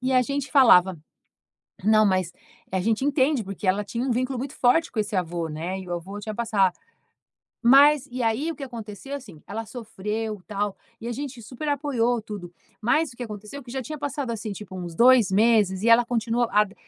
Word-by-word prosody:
e 255 +1 -1
a 255 -1 +5
gente 280 +2 -3
falava 190 - +6 0.8
não, 215 +1 +5
mas 185 -2 0 0.4
a 190 - 0
gente 220 +6 0
entende 275 -2 +2
porque 195 0 -7
ela 190 +2 +2
tinha 230 +4 -4
um - - -1
vínculo 255 +2 -1
muito 270 +4 -5
forte 325 +7 +2
com 220 - 0
esse 210 -1 -3
avô, 170 -2 -2
né. 170 +5 -4
E 185 - -10
o - - -4
avô 190 +4 -6
tinha 215 +1 -5
passa 205 -5 +2 0.9
Mas, 280 +3 +6
e 250 0 -3
aí, 230 +8 0
o - - -4
que 290 - -10
aconteceu, 235 +1 -8
assim, 205 - -10
ela 225 +2 -5
sofreu 215 -2 -5
tal 205 -1 -2 0.3
e 230 - -7
a - - -2
gente 265 -1 -6
super 255 +7 -6
apoiou 255 -5 0
tudo. 205 -5 -8 0.3
Mas 285 +7 +1
o - - -18
que 245 - -6
aconteceu, 215 +4 -8
que 245 - -12
já 265 +1 -3
tinha 305 +4 -7
passado, 285 -2 -3
assim, 220 -2 -4
tipo 200 -1 -9
uns 175 -2 -6
dois 245 -2 +6
meses 205 -2 +3
e 230 - +2
ela 230 +1 +7
continua 235 0 0
a 210 0 +4
da 200 -1 -14
225 Hz, 210 wpm, -25 LUFS, 200-255 Hz, 0.9 s, ela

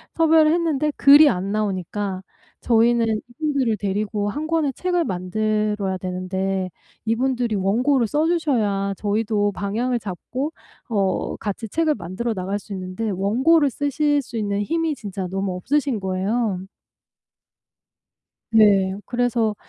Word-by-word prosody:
섭외를 320 -1 +5
했는데 310 -3 +1
글이 290 +2 +8
안 190 -1 -2
나오니까 200 -2 -2 0.4
저희는 230 -1 +3
이분들을 265 -3 -1
데리고 205 +1 -2
1 300 +8 -4
권의 320 -4 +1
책을 355 +1 0
만들어야 210 - -1
되는데 185 +1 -2 0.4
이분들이 240 0 0
원고를 235 +6 +2
써 300 +8 +1
주셔야 220 - 0
저희도 210 0 0
방향을 235 +5 -1
잡고 250 - -5 0.4
어 195 -4 0
같이 220 +1 -4
책을 315 +5 +1
만들어 220 +7 -3
나갈 195 +1 -3
수 205 - -16
있는데 185 +4 -4
원고를 260 - +3
쓰실 290 +2 0
수 240 -3 -8
있는 205 -1 -1
힘이 325 +4 -1
진짜 195 -5 -5
너무 195 0 -2
없으신 265 +3 0
거예요. 190 +1 -1 1.9
네. 200 -4 +5
그래서 240 -3 0
215 Hz, 275 characters per minute, -22 LUFS, 195-275 Hz, 1.9 s, 글이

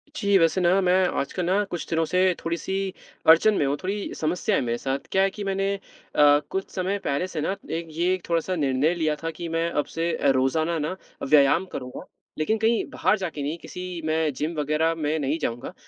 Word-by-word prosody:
जी, 200 -6 +3
वैसे 165 +1 +3
ना 180 +2 +4
मैं 180 -1 +3 0.3
आजकल 170 +5 -2
ना 195 +3 +2
कुछ 175 - -4
दिनों 165 0 +1
से 180 +4 0 0.2
थोड़ी-सी 190 +3 -2 0.3
अड़चन 165 +7 +7
में 150 - +1
हूँ, 140 - +1
थोड़ी 200 +2 -3
समस्या 180 +6 0
है - - +2
मेरे 120 -2 -1
साथ, 135 +2 -2
क्या 190 - +3
है 195 - +3
कि 205 +1 -7
मैंने 195 0 0
अ, 145 -6 +2
कुछ 190 0 -3
समय 190 +2 0
पहले 140 +6 0
से 155 - -4
ना, 195 - -1
एक 165 +1 -3
ये 170 +4 +1
एक 185 -2 -5
थोड़ा-सा 170 +2 0
निर्णय 145 +1 +1
लिया 155 -3 0
था 165 - -1
कि 170 +1 -6
मैं 165 +1 0
अब 145 - 0
से 165 +1 0
अ, 140 - +2
रोजाना 155 +6 +1
ना 155 +5 -2 0.3
व्यायाम 145 +5 +4
करूँगा, 125 -1 -7 0.3
लेकिन 185 +9 +1
कहीं 225 +1 +2
बाहर 190 +4 +1
जाके 170 -6 -4
नहीं, 150 +4 -2
किसी 180 0 -7
मैं 155 -1 +1
जिम 155 +5 -3
वग़ैरह 155 +3 +1
मैं 155 0 -1
नहीं 145 +2 0
जाऊँगा, 120 +2 -3
165 Hz, 210 wpm, -25 LUFS, 150-185 Hz, 0.3 s, अड़चन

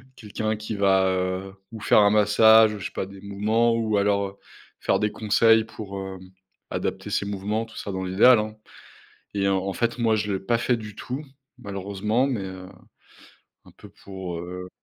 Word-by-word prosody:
quelqu'un 110 -1 -3
qui 110 0 -5
va, 95 -1 +3
heu, 95 +1 -2 0.2
ou 115 - -8
faire 105 - +4
un 100 0 +5
massage, 110 +1 +5
je 95 - -7
sais - - -4
pas 95 - -4
des 100 0 -12
mouvements 110 +4 +1
ou 110 -2 0
alors, 100 0 +1
heu, 100 +1 -12 0.4
faire - - +1
des 105 0 0
conseils 110 +1 +3
pour, 105 -3 -8
hem, 95 -1 -7 0.5
adapter - - -3
ses - - -1
mouvements, 105 +3 -2
tout 115 - -15
ça, 100 - -5
dans 95 0 -3
l'idéal, 100 +7 +5
hein 110 0 -4 0.8
et 100 -1 0
en 95 -1 +2
en 95 +1 -3
fait, 120 +5 -1
moi, 115 -2 +2
je 105 -1 -2
l'ai 95 - -2
pas 115 +5 +1
fait 120 +1 +1
du 105 -2 -9
tout, 130 +6 -5 0.4
malheureusement, 100 +3 -1
mais 130 -6 -2
heu, 95 -1 -8 1.0
un - - -16
peu - - -14
pour, 95 -3 -8
heu 90 +1 -7
100 Hz, 190 wpm, -24 LUFS, 95-110 Hz, 1.0 s, un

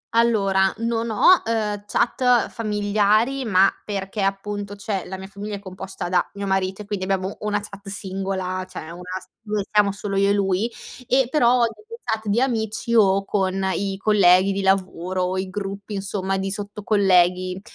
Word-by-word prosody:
Allora 195 -5 +3
non 230 0 -1
ho, 350 - +5
ehm, 210 -2 -2
chat 245 +1 +2
familiari 215 +4 +1
ma 195 -2 +5 0.2
perché 200 0 -4
appunto, 200 +1 -2
cioè, 200 -2 -3
la 190 - -6
mia 190 - -8
famiglia 205 +1 -6
è - - -6
composta 190 -1 -7
da 180 0 +2
mio 200 0 -5
marito 190 +1 -1
e - - -15
quindi 200 -2 -3
abbiamo 190 0 -1
una 210 -1 0
chat 200 -1 -11
singola, 190 -2 -3
cioè 160 -2 -8
una 175 +1 -9 0.2
s - - -16 0.2
dove 210 -2 -2
siamo 210 -2 +4
solo 200 0 -5
io 200 +1 +3
e - - +4
lui, 200 +3 0 0.4
e 260 -1 +3
però 245 -4 +4
nelle 430 - -3
chat 220 -1 -2
di 205 +4 +2
amici 230 -2 -1
o 195 -2 +4
con 190 -1 0
i 195 -1 -2
colleghi 195 -2 +4
di 195 - -2
lavoro 185 -1 0
o 185 +1 -1
i 190 0 -3
gruppi 200 +1 -5
insomma 195 -1 -2
di 195 0 -2
sotto-colleghi, 190 -3 +1
200 Hz, 170 wpm, -22 LUFS, 190-215 Hz, 0.4 s, ho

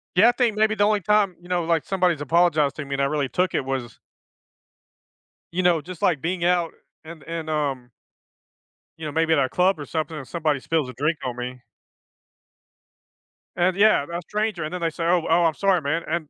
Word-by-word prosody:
Yeah, 215 +7 +7
I - - +5
think 245 -3 0
maybe 215 0 +2
the 205 - +3
only 210 -1 +2
time, 205 -1 +2
you 175 - -15
know, 175 -2 0
like, 165 -2 +1
somebody's 180 -5 +1
apologized 155 -1 +2
to 155 - -5
me 140 0 -3
and 140 - -1
I - - +3
really 145 -1 -1
took 180 +6 0
it - - 0
was 130 -4 -4 1.5
you 185 +2 -1
know, 175 -3 +3
just, 175 +2 -10
like, 160 -7 +2
being 175 +2 -2
out, 175 -1 +1 0.3
and 160 -1 -11
and, 165 -1 -5
um 140 -5 -2 1.1
you 160 - -7
know, 150 - -3
maybe 160 +2 +2
at 160 - +3
a 130 -2 +1
club 180 +4 +2
or 145 - -6
something, 160 +1 -3
and 135 -4 -7
somebody 155 -5 -1
spills 155 0 -1
a - - -8
drink 150 +6 -1
on 125 -2 -3
me. 125 +1 -6 2.0
And 180 +1 +2
yeah, 205 -8 +4
a 170 +1 -3
stranger, 210 -1 -2
and 155 - -5
then 180 - -4
they 165 - +1
say, 165 +1 -5
"Oh, 170 -1 +2
oh, 170 +1 +4
I'm 165 - +2
sorry, 190 0 +2
man," 155 +4 -1
and 160 - 0
and - - -34
165 Hz, 215 wpm, -23 LUFS, 145-180 Hz, 2.0 s, Yeah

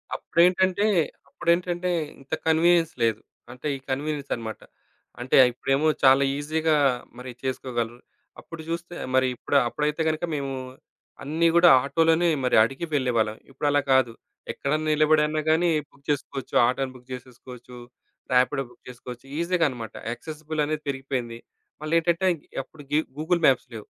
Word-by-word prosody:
అప్పుడేంటంటే 185 +3 +2 0.4
అప్పుడేంటంటే 175 +1 0 0.3
ఇంత 135 +2 -10
కన్వీనియన్స్ 165 +1 +3
లేదు. 115 -2 +1 0.3
అంటే 125 +4 -6
ఈ - - -14
కన్వీనియన్స్ 145 +1 -3
అనమాట. 110 -2 -7 0.6
అంటే 125 - 0 0.2
ఇప్పుడేమో 135 +5 0 0.2
చాలా 135 +1 +6
ఈజీగా 155 +2 0 0.4
మరి 125 0 -8
చేసుకోగలరు. 120 -3 -3 0.4
అప్పుడు 165 -1 -10
జూస్తే 170 +1 -4 0.2
మరి 130 0 +4
ఇప్పుడు 140 - 0
అప్పుడైతే 150 +5 -1
గనుక 155 +1 -3
మేము 140 -1 -3 0.7
అన్నీ 160 +4 +1
కూడా 170 0 +7
ఆటో‌లోనే 165 +4 +2 0.2
మరి 125 - +2
అడిగి 135 +8 -3
వెళ్ళేవాళ్ళం. 115 -5 0
ఇప్పుడలా 145 +2 +1
కాదు. 130 -3 +3 0.4
ఎక్కడన్నా 155 +2 -2
నిలబడినా 155 0 +3
గానీ, 165 +2 +3 0.2
బుక్ 140 0 -26
చేసుకోవచ్చు. 140 -2 -3
ఆటో‌ని 130 +1 -1
బుక్ 125 0 -17
జేసేసుకోచ్చు, 125 0 -10 0.6
రాపిడో 130 +2 +3
బుక్ - - -22
చేసుకోవచ్చు, 125 0 -10
ఈజీగా 170 0 +1
అన్నమాట. 115 -4 -8 0.2
యాక్సెసిబుల్ 155 +5 -5
అనేది 155 0 -3
పెరిగిపోయింది. 130 -4 -4 0.4
మళ్ళేంటంటే, 165 +3 +1 0.4
అప్పుడు 145 +3 -15
గే 150 - +5 0.2
గూగుల్ 170 +2 0
మాప్స్ 135 0 +2
లేవు. 110 - -8
145 Hz, 130 wpm, -25 LUFS, 125-160 Hz, 0.7 s, కూడా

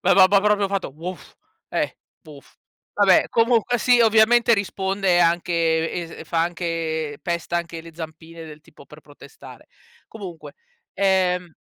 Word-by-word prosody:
Va - - +3
ba 190 -1 +7
ba 200 0 +4
proprio 205 -1 +2
fatto: 195 -1 -2
"Woof". 175 +3 -9 0.3
Eh, - - -2 0.3
"woof". 145 -3 -16 0.4
Vabbè 200 -3 +4
comunque 235 +1 +2
sì 245 +1 +3
ovviamente 230 +2 +4
risponde 195 -2 0
anche 165 -1 +1 0.3
es 160 - -12
fa 165 -1 +1
anche 165 -3 -3
pesta 170 -1 -3
anche 170 -1 -5
le 165 -1 -14
zampine 165 0 -10
del 155 -1 -12
tipo, - - -18
per - - -15
protestare. - - -15 0.4
Comunque, 190 -7 -10 0.4
ehm 180 -3 0
175 Hz, 140 wpm, -22 LUFS, 165-200 Hz, 0.4 s, ba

